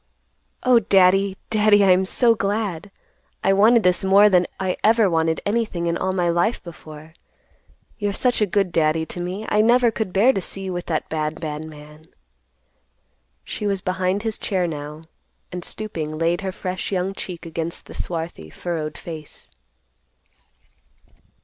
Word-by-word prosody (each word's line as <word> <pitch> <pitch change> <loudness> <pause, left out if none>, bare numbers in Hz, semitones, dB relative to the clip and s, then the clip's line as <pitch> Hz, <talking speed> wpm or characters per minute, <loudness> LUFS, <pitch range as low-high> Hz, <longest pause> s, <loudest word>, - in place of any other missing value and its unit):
"Oh, 250 -2 +5
Daddy, 195 -1 +3
Daddy, 210 -2 +4
I'm 185 0 +4
so 235 +4 +3
glad! 205 -4 -2 0.5
I 195 - +4
wanted 220 +3 +5
this 180 +1 +2
more 200 +2 +6
than 180 -2 +3
I 185 -1 -1
ever 220 -1 +4
wanted 160 -2 0
anything 205 -5 -1
in 170 0 0
all 190 - -1
my 180 -2 0
life 175 +7 +1
before. 155 -2 -12 0.9
You're 205 -1 0
such 245 +3 0
a 210 - +3
good 195 -1 0
Daddy 160 0 +1
to 175 - -6
me, 185 +5 -4
I 210 - +3
never 240 +1 +4
could 220 -3 -3
bear 220 +8 +4
to 195 - -2
see 195 +2 -4
you 190 -1 -4
with 175 0 -5
that 160 -2 -2
bad, 155 0 -2
bad 155 -1 -5
man." 150 0 -13 1.4
She 210 - -4
was 195 -2 -1
behind 185 +2 -1
his 220 -2 -3
chair 185 -3 0
now, 150 -1 -6 0.5
and, 180 -1 -6
stooping, 160 -9 -5
laid 170 +3 0
her 190 -1 -3
fresh 185 0 -5
young 190 0 -1
cheek 180 -3 -7
against 165 0 -4
the - - -11
swarthy, 165 - -5
furrowed 155 - -4
face. 155 -3 -10
185 Hz, 160 wpm, -22 LUFS, 165-205 Hz, 1.4 s, more